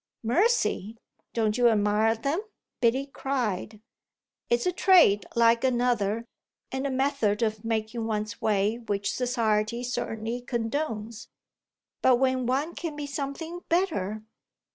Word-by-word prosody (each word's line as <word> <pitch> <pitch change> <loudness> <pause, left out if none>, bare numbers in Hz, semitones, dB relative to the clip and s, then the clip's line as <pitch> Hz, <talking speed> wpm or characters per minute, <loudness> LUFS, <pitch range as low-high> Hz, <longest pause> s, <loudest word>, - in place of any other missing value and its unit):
"Mercy! 240 - +1 0.3
don't 220 0 0
you 240 -1 +6
admire 215 +1 +2
them?" 280 - -1 0.4
Biddy 255 +3 +2
cried. 230 -7 -3 0.7
"It's 240 0 +2
a 360 - +2
trade 345 - +5
like 230 0 +4
another 240 -4 +1 0.5
and 265 +1 -2
a - - -2
method 260 -5 +1
of 215 -1 -1
making 225 0 -2
one's 215 -1 -3
way 210 +1 +1
which 205 -4 -2
society 235 -2 0
certainly 230 -1 -3
condones. 230 -2 -3 0.7
But 255 - +5
when 260 0 +1
one 280 +7 0
can 330 -4 -5
be 295 -1 -4
something 285 +5 -5
better 215 - 0
235 Hz, 120 wpm, -27 LUFS, 215-270 Hz, 0.7 s, you